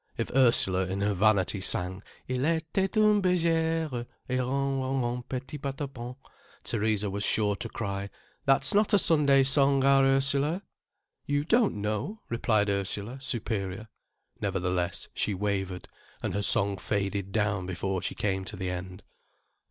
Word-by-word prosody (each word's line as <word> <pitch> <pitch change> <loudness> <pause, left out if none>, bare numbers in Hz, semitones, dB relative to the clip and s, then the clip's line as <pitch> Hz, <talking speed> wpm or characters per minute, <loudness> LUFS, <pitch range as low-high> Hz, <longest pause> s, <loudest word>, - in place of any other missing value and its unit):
If - - -2
Ursula 95 -8 +4
in 95 +1 -3
her 100 0 +1
vanity 100 -1 +2
sang: 95 +1 -1 0.3
"Il 130 0 -2
était 165 +6 0
un' 210 -1 +5
bergère 165 -7 +1 0.2
Et 130 0 0
ron 135 +1 -1
ron 130 +1 -1
ron 120 +1 -2
petit 130 +4 -6
patapon," 135 -3 -5 0.5
Theresa 110 -2 0
was 100 +1 -2
sure 105 -1 +2
to - - -5
cry: 100 -2 -4 0.4
"That's 135 +9 +3
not 210 +1 +4
a - - +7
Sunday 145 -7 +4
song, 140 0 +4
our 135 0 +5
Ursula." 140 +6 +2 0.6
"You 145 0 0
don't 230 - +3
know," 105 - -3
replied 110 -3 +1
Ursula, 100 +5 -3
superior. 110 -5 -3 0.5
Nevertheless, 90 -1 -1
she 105 - -1
wavered. 95 -2 -2 0.4
And - - -2
her 100 - -1
song 100 0 +4
faded 100 -1 -2
down 105 -3 0
before 95 0 -2
she - - -3
came 95 -2 -1
to 105 - -7
the 95 -1 -3
end. 90 +1 -7
115 Hz, 145 wpm, -28 LUFS, 100-140 Hz, 0.6 s, a